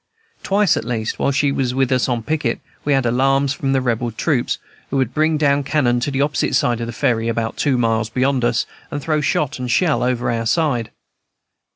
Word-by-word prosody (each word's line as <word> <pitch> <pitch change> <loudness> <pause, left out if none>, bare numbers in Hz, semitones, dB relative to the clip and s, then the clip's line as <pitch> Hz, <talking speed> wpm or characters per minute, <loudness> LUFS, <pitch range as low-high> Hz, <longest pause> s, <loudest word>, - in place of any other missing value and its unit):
Twice, 200 0 +2
at - - -2
least, 115 -2 -3
while - - +1
she 140 0 +1
was 130 -2 -1
with 135 0 +1
us 130 0 +2
on 120 -2 -1
picket, 155 +4 -1 0.2
we 145 - +1
had 135 -2 +2
alarms 135 +3 +2
from 135 -1 -2
the 135 -1 +2
Rebel 120 -1 -1
troops, 125 +2 0 0.3
who 140 - -1
would 130 -3 0
bring 155 0 +2
down 145 -1 +2
cannon 130 -4 +1
to 125 - -1
the 135 -1 -1
opposite 145 0 0
side 120 -1 +1
of 115 - -3
the - - -4
Ferry, 115 0 0
about 115 -1 -2
two 140 -4 +1
miles 115 -2 +1
beyond 130 +2 0
us, 120 0 +1 0.2
and 145 - -4
throw 155 +1 0
shot 140 -1 0
and 125 -1 -4
shell 155 +6 +2
over 125 -1 0
upon 115 - -1
our 115 - -2
side. 125 -6 +1
130 Hz, 220 wpm, -19 LUFS, 120-145 Hz, 0.3 s, Twice